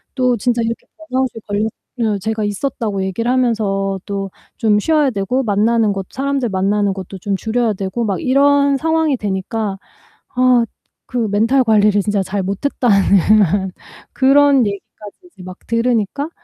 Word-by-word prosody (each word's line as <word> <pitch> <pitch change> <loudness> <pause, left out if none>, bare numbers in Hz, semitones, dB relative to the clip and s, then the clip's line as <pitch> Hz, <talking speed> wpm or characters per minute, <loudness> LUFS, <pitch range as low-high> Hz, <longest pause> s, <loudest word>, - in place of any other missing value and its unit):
또 250 -2 +2
진짜 235 +2 0
이렇게 230 0 -4
번아웃이 260 -5 -2 0.2
걸렸 210 +2 -1 0.3
어 215 -3 +1
제가 220 +2 -2
있었다고 205 -2 -2
얘기를 230 +6 -1
하면서 200 -6 0
또 195 -1 -4 0.3
좀 210 -2 +2
쉬어야 300 +2 +2
되고 220 +6 -1
만나는 215 0 +2
곳 195 -1 -5
사람들 270 -3 -1
만나는 200 +1 0
것도 190 0 -8
좀 200 +2 -2
줄여야 230 +1 0
되고 195 +4 -3
막 195 -5 -1
이런 280 +1 +3
상황이 320 -1 +1
되니까 200 0 -3 0.6
아 250 -2 +4 0.4
그 245 -2 -1
"멘탈 230 +6 +3
관리를 210 -3 +3
진짜 205 0 0
잘 190 0 -3
못했다."는 200 - +2 0.4
그런 275 -2 +4
얘기까지 200 +1 -8 0.2
이제 - - -16
막 185 +1 -9
들으니까 230 +4 0
220 Hz, 315 characters per minute, -17 LUFS, 200-255 Hz, 0.6 s, 아